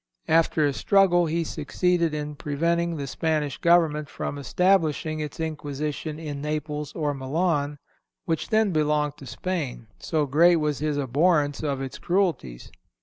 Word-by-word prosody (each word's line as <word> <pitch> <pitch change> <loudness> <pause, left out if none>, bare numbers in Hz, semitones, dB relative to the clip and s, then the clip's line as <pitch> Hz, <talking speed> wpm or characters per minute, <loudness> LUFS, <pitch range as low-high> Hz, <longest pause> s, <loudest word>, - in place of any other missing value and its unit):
After 160 -1 +3
a 145 - +1
struggle 175 0 +3
he 165 +2 0
succeeded 170 +2 0
in 150 0 -4
preventing 170 +4 -1
the 140 - -4
Spanish 150 0 -1
government 160 -4 +3
from 145 - -5
establishing 160 -1 +1
its 150 0 -5
Inquisition 150 -1 -4
in 150 -3 -6
Naples 150 0 -3
or 150 -3 -1
Milan, 145 +1 -1 0.5
which 165 -3 -2
then 220 -2 +3
belonged 150 -2 +1
to 140 - -11
Spain, 140 -1 -4
so 155 -3 0
great 165 +6 +5
was 150 -3 0
his 150 -1 -1
abhorence 145 +2 +2
of 140 -3 -2
its 135 -1 -6
cruelties. 170 - -1
150 Hz, 145 wpm, -25 LUFS, 145-170 Hz, 0.5 s, great